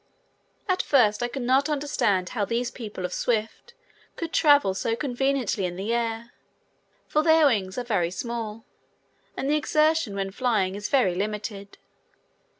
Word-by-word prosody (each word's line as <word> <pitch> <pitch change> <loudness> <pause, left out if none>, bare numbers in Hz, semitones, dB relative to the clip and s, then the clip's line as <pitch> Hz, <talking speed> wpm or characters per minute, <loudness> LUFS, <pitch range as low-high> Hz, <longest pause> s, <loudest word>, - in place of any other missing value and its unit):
At 370 -1 +1
first 220 -7 +3
I 240 - +1
could 250 +1 -5
not 265 +4 +2
understand 275 -11 0
how 220 -4 -2
these 235 +4 -1
people 210 -6 -6
of 180 - -4
Swift 235 - -2 0.4
could 335 -2 -5
travel 285 - +4
so 225 +4 -1
conveniently 265 -4 -1
in 175 -1 -2
the 200 +5 -2
air, 235 0 -2 0.8
for 305 - +2
their 320 0 +5
wings 200 -8 +1
are 250 - -1
very 200 -8 0
small 225 0 -5 0.7
and 270 - -2
the 300 +2 +3
exertion 305 -7 +1
when 195 -1 -3
flying 210 -5 0
is 205 +1 -5
very 250 -10 +3
limited. 205 +1 -5
235 Hz, 150 wpm, -25 LUFS, 205-275 Hz, 0.8 s, their